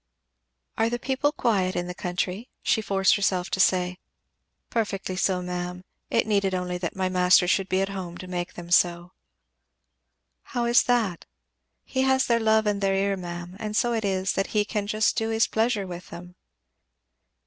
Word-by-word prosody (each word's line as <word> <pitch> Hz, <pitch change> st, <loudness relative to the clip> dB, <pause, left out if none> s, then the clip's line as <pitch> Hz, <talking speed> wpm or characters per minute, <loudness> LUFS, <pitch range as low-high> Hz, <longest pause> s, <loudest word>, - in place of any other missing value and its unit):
"Are 225 Hz, +1 st, +3 dB
the 240 Hz, -, -1 dB
people 265 Hz, +4 st, 0 dB
quiet 200 Hz, -10 st, 0 dB
in 175 Hz, -, -1 dB
the 180 Hz, -, -5 dB
country?" 180 Hz, +5 st, -3 dB
she 220 Hz, -, +2 dB
forced 195 Hz, -2 st, +3 dB
herself 190 Hz, -3 st, 0 dB
to -, -, -1 dB
say. 180 Hz, -1 st, +2 dB, 0.7 s
"Perfectly 195 Hz, -4 st, -2 dB
quiet, 185 Hz, -1 st, 0 dB
ma'am. 180 Hz, 0 st, -4 dB, 0.3 s
It -, -, +2 dB
needed 200 Hz, -3 st, +1 dB
only 180 Hz, -1 st, -3 dB
that 175 Hz, -2 st, -4 dB
my 190 Hz, -1 st, 0 dB
master 180 Hz, -1 st, +4 dB
should 190 Hz, +1 st, +1 dB
be 190 Hz, +1 st, +2 dB
at 195 Hz, -, -1 dB
home 185 Hz, -3 st, -6 dB
to -, -, -8 dB
make 180 Hz, -1 st, -4 dB
them 175 Hz, 0 st, -9 dB
so." 175 Hz, 0 st, +3 dB, 1.3 s
"How 240 Hz, -2 st, -3 dB
is 235 Hz, 0 st, +5 dB
that?" 225 Hz, -8 st, 0 dB, 0.6 s
"He 260 Hz, -, -2 dB
has 265 Hz, 0 st, +3 dB
their 235 Hz, -1 st, +2 dB
love 220 Hz, -1 st, +3 dB
and 205 Hz, -1 st, 0 dB
their 195 Hz, -1 st, +2 dB
ear, 195 Hz, +1 st, +1 dB
ma'am, 175 Hz, -1 st, -7 dB
and 215 Hz, -1 st, -3 dB
so 240 Hz, -1 st, +2 dB
it 225 Hz, -1 st, -1 dB
is 190 Hz, -1 st, 0 dB
that 195 Hz, -, 0 dB
he 210 Hz, -, +3 dB
can 210 Hz, -1 st, -3 dB
just 215 Hz, +1 st, +1 dB
do 225 Hz, 0 st, -1 dB
his 225 Hz, 0 st, +3 dB
pleasure 220 Hz, -2 st, 0 dB
with 180 Hz, -1 st, -8 dB
them." 175 Hz, +1 st, -10 dB
195 Hz, 180 wpm, -25 LUFS, 180-220 Hz, 1.3 s, is